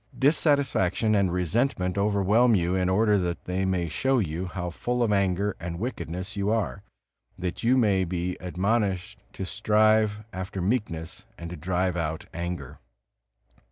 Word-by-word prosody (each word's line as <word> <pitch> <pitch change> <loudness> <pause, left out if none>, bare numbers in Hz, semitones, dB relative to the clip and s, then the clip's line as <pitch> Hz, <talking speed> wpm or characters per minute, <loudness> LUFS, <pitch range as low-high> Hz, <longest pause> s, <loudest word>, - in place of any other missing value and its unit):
Dissatisfaction 135 - +2
and 100 -4 +2
resentment 90 - 0
overwhelm 105 +4 +3
you 90 -1 +1
in 95 -1 +1
order 105 +1 +3
that 90 -1 -2
they 95 +1 -1
may 90 -2 0
show 130 - +1
you 90 -3 -1
how 90 -1 -4
full 125 +7 -1
of 110 - +1
anger 100 0 +1
and 85 0 -5
wickedness 95 -3 -4
you 100 0 0
are, 105 - -1 0.6
that 90 0 -4
you 125 +3 +3
may 100 -6 +3
be 90 0 -2
admonished 95 +1 -1
to 95 - -5
strive 105 +1 +2
after 95 +1 -5
meekness 95 -2 -2
and 85 0 -7
to - - -5
drive 90 +2 -1
out 80 -2 -3
anger. 85 +1 -5
95 Hz, 150 wpm, -26 LUFS, 90-110 Hz, 0.6 s, overwhelm